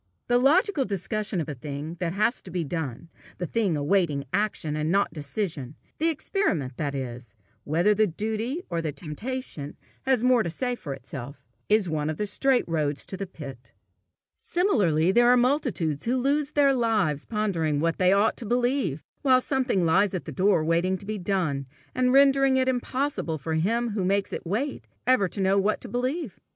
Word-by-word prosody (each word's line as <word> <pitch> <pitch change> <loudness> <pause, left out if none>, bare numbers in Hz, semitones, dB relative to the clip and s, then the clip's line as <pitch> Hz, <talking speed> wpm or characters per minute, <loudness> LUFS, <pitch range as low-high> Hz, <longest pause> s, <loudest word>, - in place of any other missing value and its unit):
The 245 0 +4
logical 300 +4 +3
discussion 205 -1 -2
of 160 - -2
a 150 - -4
thing 145 +5 -6
that 175 -2 -1
has 215 +5 +1
to - - -11
be 180 -1 -2
done, 160 -2 -4 0.3
a 180 - -1
thing 195 -4 0
awaiting 145 -2 +1
action 200 -7 0
and 155 +1 -1
not 200 +3 +2
decision 150 - -4 0.2
the 325 +2 +3
experiment, 195 - -1
that 145 -2 -2
is, 125 -2 -6 0.3
whether 170 +8 +3
the 215 +1 +3
duty 220 - -3
or 170 -2 -2
the 160 -2 -2
temptation 160 - -6 0.3
has 260 -4 +3
the - - 0
more 250 -2 +5
to 175 - -2
say 245 +9 -2
for 145 - -5
itself, 140 0 -9 0.2
is 210 -2 +3
one 155 -2 -1
of 155 - -3
the 210 - -1
straight 255 +5 +2
roads 150 -3 -1
to - - -6
the 195 0 -5
pit. 135 -8 -10 0.7
Similarly, 190 - +2
there 240 +4 +5
are 250 - +6
multitudes 240 - 0
who 245 +3 +1
lose 285 +3 0
their 280 -2 +4
lives 215 - +1
pondering 175 -9 0
what 165 +2 0
they 185 0 +4
ought 200 +3 +3
to 235 - -4
believe, 240 - 0 0.2
while 260 -2 +5
something 255 -9 0
lies 190 +4 +3
at 180 - -4
their 155 - -6
door 185 0 +3
waiting 170 +4 +1
to 200 - -10
be 215 0 -3
done, 170 -8 -1 0.3
and 255 0 +2
rendering 275 0 +5
it 260 0 +2
impossible 250 - -1
for 160 +3 -4
him 230 +9 +1
who 205 -2 -1
makes 200 +2 0
it - - -5
wait, 255 - -2 0.2
ever 255 -6 +4
to 195 - -5
know 190 +1 +3
what 205 +2 +1
to - - -6
believe. 255 - -3
195 Hz, 190 wpm, -26 LUFS, 160-245 Hz, 0.7 s, are